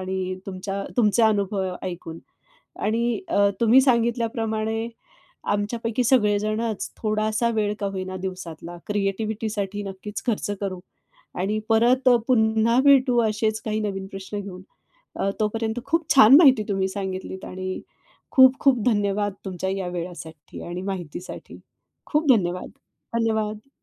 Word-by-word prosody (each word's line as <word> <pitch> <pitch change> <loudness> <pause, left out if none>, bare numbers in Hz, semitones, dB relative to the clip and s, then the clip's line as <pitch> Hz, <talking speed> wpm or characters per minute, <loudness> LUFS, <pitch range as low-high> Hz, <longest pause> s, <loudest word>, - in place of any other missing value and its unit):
आणि 185 0 -3
तुमच्या 195 +1 -4
तुमचा 220 -1 +4
अनुभव 200 -3 -1
ऐकून. 175 -3 -6 0.6
आणि 230 +2 0
अ, 200 -8 +3
तुम्ही 235 +3 +6
सांगितल्याप्रमाणे 230 -3 0 0.6
आमच्यापैकी 230 +3 -1
सगळेजणच 215 -2 +1
थोडासा 215 +1 0
वेळ 210 -1 0
का 200 - -1
होईना 185 0 -4
दिवसातला 175 -2 -6
क्रिएटिव्हिटीसाठी 205 0 -2
नक्कीच 195 +1 -7
खर्च 220 -3 -1
करू. 190 -3 -3 0.5
आणि 200 +4 -1
परत 245 +4 +4 0.2
पुन्हा 225 0 +3
भेटू 265 -3 +5
अशेच 220 0 0
काही 215 -1 -1
नवीन 195 -2 -3
प्रश्न 195 +1 -6
घेऊन. 190 -2 -8 0.5
अ, 195 - 0
तोपर्यंत 220 +2 -1
खूप 325 +2 0
छान 265 -1 +9
माहिती 270 -8 +6
तुम्ही 195 -2 0
सांगितलीत 190 -1 -5
आणि 185 0 -5 0.5
खूप 260 0 +7
खूप 260 -5 +3
धन्यवाद 205 -2 +1
तुमच्या 190 -1 -3
या 190 -2 -3
वेळासाठी 170 -4 -7
आणि 175 +1 -5
माहितीसाठी. 185 -3 -7 0.5
खूप 300 0 0
धन्यवाद, 180 -5 0 0.5
धन्यवाद. 220 0 -1
210 Hz, 120 wpm, -24 LUFS, 190-230 Hz, 0.6 s, छान